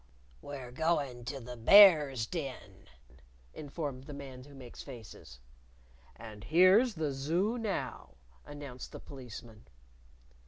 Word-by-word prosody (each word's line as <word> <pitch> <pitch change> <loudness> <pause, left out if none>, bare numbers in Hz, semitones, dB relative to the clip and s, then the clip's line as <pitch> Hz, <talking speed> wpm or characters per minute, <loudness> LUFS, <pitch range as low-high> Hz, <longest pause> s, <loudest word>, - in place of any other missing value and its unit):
"We're 135 -4 -8
going 140 -5 -1
to 135 +3 -5
the 125 0 -9
Bear's 145 - +7
Den," 130 - -7 0.7
informed 145 -3 -6
the 145 - -8
Man 130 -2 -9
Who 145 -1 -15
Makes 125 -3 -11
Faces. 110 - -12 0.8
"And 105 -2 -11
here's 190 +8 +5
the 155 -3 -2
Zoo 175 - -1
now," 215 -4 -4 0.3
announced 145 -4 -9
the - - -7
Policeman. 120 -5 -11
140 Hz, 115 wpm, -31 LUFS, 125-160 Hz, 0.8 s, Bear's